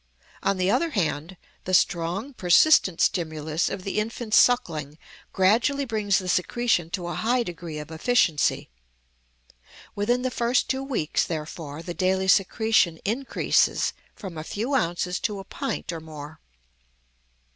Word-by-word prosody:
On 195 0 0
the 185 +1 +1
other 335 +8 +1
hand, 175 - -2 0.3
the 185 - +2
strong, 180 +11 0
persistent 185 - +4
stimulus 155 -2 0
of 185 - -5
the 195 +2 -2
infant's 220 +1 +1
suckling 155 - +1 0.3
gradually 235 +9 +2
brings 210 -5 +1
the 185 - -4
secretion 180 -1 +1
to 175 0 -4
a 175 - -4
high 240 +8 +1
degree 170 -5 -7
of 150 +1 -8
efficiency. 160 - +1 1.2
Within 240 +5 0
the 255 - -1
first 240 +1 +1
two 265 0 -1
weeks, 255 - -1
therefore, 155 -1 -6
the 175 - -5
daily 190 +1 0
secretion 195 -2 +3
increases 245 +6 +1 0.2
from 185 -6 -8
a - - -5
few 225 - -3
ounces 180 -6 0
to 210 -3 -2
a 195 - -7
pint 270 +4 -4
or 165 - -5
more. 155 -1 -10
190 Hz, 140 wpm, -25 LUFS, 165-230 Hz, 1.2 s, persistent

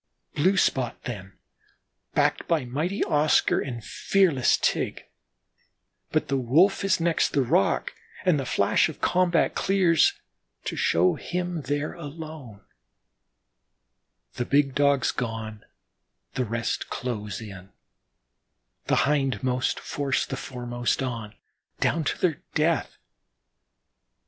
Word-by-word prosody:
Blue 185 +6 +2
spot 130 -8 0
then, 100 -5 -7 0.8
backed - - +1
by 160 -6 +1
mighty 155 - -1
Oscar 150 +1 +3
and 120 -4 -5
fearless 175 -10 +2
Tige - - -1 1.1
but - - +1
the 135 - 0
Wolf 160 +12 +3
is 195 -2 +2
next 165 -1 +1
the 140 - +3
rock 165 +10 +1 0.3
and 175 -6 +3
the 135 - -3
flash - - +2
of - - -9
combat 175 -2 +2
clears 185 -5 +3 0.4
to - - -4
show 90 +2 +3
him 175 -2 -3
there 145 +1 -1
alone, 155 -8 -9 1.8
the 120 - -1
big 140 0 +2
Dogs 140 -1 +3
gone; 110 -3 -5 0.7
the 130 -1 -1
rest 115 +1 -2
close 105 -5 -4
in, 100 -4 -10 1.2
the - - +3
hindmost 130 -3 0
force 140 -2 -1
the 135 - -4
foremost 120 0 -2
on 115 -4 -5 0.4
down 165 - +1
to - - -1
their 165 -5 0
death. 160 +1 +1
140 Hz, 115 wpm, -26 LUFS, 120-165 Hz, 1.8 s, Oscar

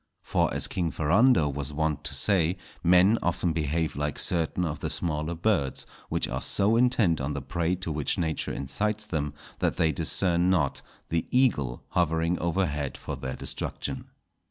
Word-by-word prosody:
For, - - +1
as - - 0
King 85 -2 -1
Ferrando 85 - +4
was 70 0 -3
wont 75 0 -1
to 75 -2 -4
say, 90 +3 +2 0.3
men 90 +6 +5
often 85 -1 0
behave 80 +1 -1
like 75 0 -2
certain 85 +1 0
of 75 -2 -3
the - - -3
smaller 80 0 -2
birds, 85 -7 0 0.2
which - - 0
are 65 +1 -3
so 100 - +3
intent 115 - +3
on 70 +3 -2
the 70 - -3
prey 85 +5 0
to 90 -2 -5
which 75 -2 -1
nature 80 -2 -1
incites 105 +10 -2
them, 75 -7 -3 0.2
that - - 0
they 80 -3 +3
discern 85 +4 +1
not 80 -7 +1 0.3
the 80 -1 -1
eagle 75 - +1
hovering 85 0 +1
overhead 85 -5 -1
for - - -5
their 65 -1 -5
destruction. - - -4
80 Hz, 165 wpm, -27 LUFS, 75-90 Hz, 0.3 s, men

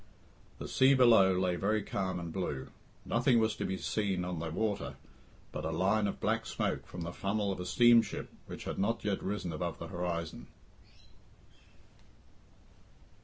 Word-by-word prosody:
The - - -6
sea 135 +1 +5
below 115 -7 +6
lay 90 -1 +1
very 105 +3 +1
calm 95 -2 -2
and 85 -2 -6
blue. 75 -8 -3 0.4
Nothing 120 +1 +3
was 110 -1 +2
to - - -2
be 95 - -2
seen 95 -4 -1
on 90 -2 -3
the 80 0 -3
water 105 +4 -2 0.6
but 75 - -5
a 80 - -1
line 95 +6 +2
of - - -4
black - - 0
smoke - - -2
from 90 - -7
the 85 +1 -4
funnel 100 +1 -1
of 95 - -4
a 90 - -4
steamship 120 +1 +4 0.2
which - - -7
had - - -4
not 110 +3 0
yet 100 -2 0
risen 95 -4 -3
above 85 +2 -3
the 85 - -7
horizon. 85 -2 -4
95 Hz, 165 wpm, -32 LUFS, 85-110 Hz, 0.6 s, below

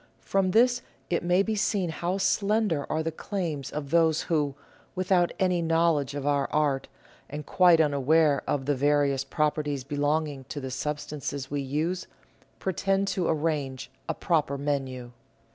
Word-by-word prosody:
From 195 -1 +1
this 240 +5 +4 0.3
it 170 - +1
may 180 +2 +3
be 220 - -1
seen 200 -4 0
how 175 +3 -2
slender 200 -5 +1
are 160 0 0
the 165 - -2
claims 160 -5 -4
of 145 -2 -5
those 165 -2 +3
who, 150 -5 0 0.4
without 185 -1 +2
any 180 -2 +1
knowledge 165 -4 +1
of 145 -1 -4
our 140 -1 +1
art, 145 -3 +1 0.4
and 150 0 -6
quite 175 -1 +5
unaware 150 0 +3
of 135 -2 -1
the 145 - +2
various 140 0 +2
properties 150 -1 -1
belonging 145 0 -1
to 145 - -6
the 130 -1 -5
substances 145 0 -4
we 145 -1 -1
use, 155 +7 -2 0.5
pretend 195 +1 0
to 180 - -1
arrange 145 -4 -1 0.2
a - - 0
proper 150 -5 0
menu. 135 -4 -3
150 Hz, 150 wpm, -27 LUFS, 140-175 Hz, 0.5 s, quite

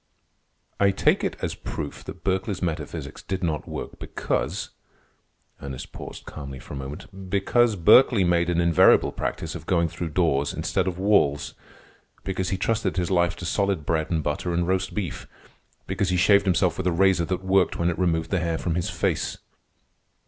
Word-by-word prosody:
"I 100 - +5
take 95 - +2
it - - -1
as - - -1
proof 70 - -6
that - - -9
Berkeley's 95 0 -1
metaphysics 80 -3 -4
did 95 -1 -4
not 80 -3 -2
work, - - -6
because—" - - -2 0.9
Ernest 65 -2 -7
paused - - -9
calmly 70 -3 -8
for - - -10
a - - -5
moment. 80 +8 -8
"Because 110 +4 +2
Berkeley 100 +4 +6
made 85 -1 +2
an 85 -1 +1
invariable 85 -2 +5
practice - - -4
of - - -9
going 85 -2 +2
through 85 0 -5
doors 70 -4 +1
instead 95 -1 -1
of 90 -1 -2
walls. 90 -8 +2 0.7
Because 95 -1 -2
he 95 - -1
trusted 105 -2 -1
his 90 +1 0
life 85 -1 +2
to 90 - -8
solid 100 -4 0
bread 80 -1 0
and 80 -3 0
butter 85 +4 -2
and 85 0 0
roast 95 0 -1
beef. 95 -7 -4 0.6
Because 95 0 -1
he 90 - +1
shaved 100 +2 +5
himself 90 -1 +2
with 95 - -1
a - - +3
razor 90 -1 +3
that 95 +2 -3
worked 95 -1 +2
when 85 +1 +1
it 85 - -5
removed 80 -3 0
the 95 - +2
hair 85 -1 -1
from 85 - -2
his 85 +1 -1
face." - - -1
90 Hz, 180 wpm, -25 LUFS, 80-95 Hz, 0.9 s, Berkeley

